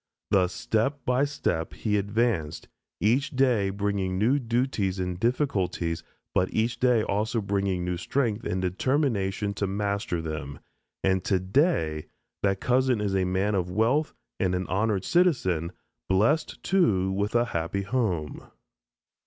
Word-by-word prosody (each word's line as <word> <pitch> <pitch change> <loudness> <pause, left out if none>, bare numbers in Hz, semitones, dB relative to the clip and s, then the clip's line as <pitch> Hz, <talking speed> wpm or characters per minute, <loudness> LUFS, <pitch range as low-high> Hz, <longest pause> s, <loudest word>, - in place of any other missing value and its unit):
Thus 95 -2 +3
step 125 +8 -1
by 125 +3 +2
step, 85 - -2
he 105 -2 -1
advanced, 100 -6 0 0.3
each 120 +7 +2
day 125 -7 +3
bringing 100 -2 -1
new 120 +8 +3
duties 115 -6 0
and 90 -1 -3
difficulties 100 - 0 0.3
but 95 0 +1
each 115 +2 0
day 125 -3 +3
also 105 +4 0
bringing 100 -3 -1
new 90 0 -2
strength 115 +2 -1
and 95 - -2
determination 100 - 0
to 100 0 -2
master 100 -2 -1
them, 75 -3 -5 0.5
and 95 -1 +2
today 95 - +1 0.3
that 95 -1 +1
cousin 125 -1 +2
is 100 -2 -1
a 95 -1 +2
man 95 +3 0
of 90 -2 0
wealth 115 +11 +1 0.2
and 90 -1 +1
an 90 +1 -2
honored 100 -1 0
citizen, 105 - +2 0.4
blessed, 110 +12 +1
too, 105 - +2
with 100 +3 -1
a 120 0 +4
happy 85 +4 -1
home. 100 -9 -2
100 Hz, 135 wpm, -27 LUFS, 95-120 Hz, 0.5 s, a